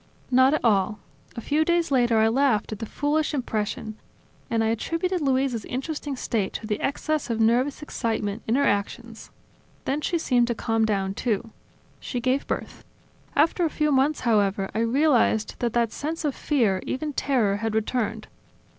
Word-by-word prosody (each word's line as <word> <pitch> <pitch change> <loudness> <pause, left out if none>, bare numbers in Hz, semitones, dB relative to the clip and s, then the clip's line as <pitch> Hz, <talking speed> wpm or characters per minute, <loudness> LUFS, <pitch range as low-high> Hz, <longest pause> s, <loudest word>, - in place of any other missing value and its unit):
"Not 260 +3 +5
at 310 - -2
all. 210 -1 +2 0.4
A 230 - -5
few 300 +6 +1
days 340 -1 +1
later 240 -4 +3
I 220 0 +4
laughed 245 -3 +2
at 215 - -5
that 225 - -6
foolish 300 +1 0
impression; 220 -3 -3 0.5
and 225 -1 +1
I 220 - +1
attributed 330 - -1
Luisa's 265 -4 +1
interesting 285 +2 -4
state 225 -5 -2
to - - -5
the 210 -1 -2
excess 305 0 -1
of 230 -1 -1
nervous 250 +6 +2
excitement 225 -6 -2
in 225 - +2
her 280 - +3
actions. 225 +2 -2 0.6
Then 285 +3 -1
she 340 - 0
seemed 245 -7 +2
to 240 - -1
calm 225 0 +1
down, 195 -3 0
too. 225 +1 -2 0.5
She 245 - -4
gave 255 +3 0
birth. - - -4 0.5
After 325 +5 +3
a 330 - +2
few 300 0 0
months, 280 +3 +2
however, 200 -4 +1
I 215 - -1
realized 235 -2 +2
that 235 -2 -1
that 235 -2 +1
sense 315 +5 -4
of 290 - 0
fear, 225 -12 +1
even 300 +2 -3
terror, 235 -9 +1
had 220 +1 -2
returned. 220 0 -1
240 Hz, 170 wpm, -25 LUFS, 220-285 Hz, 0.6 s, Not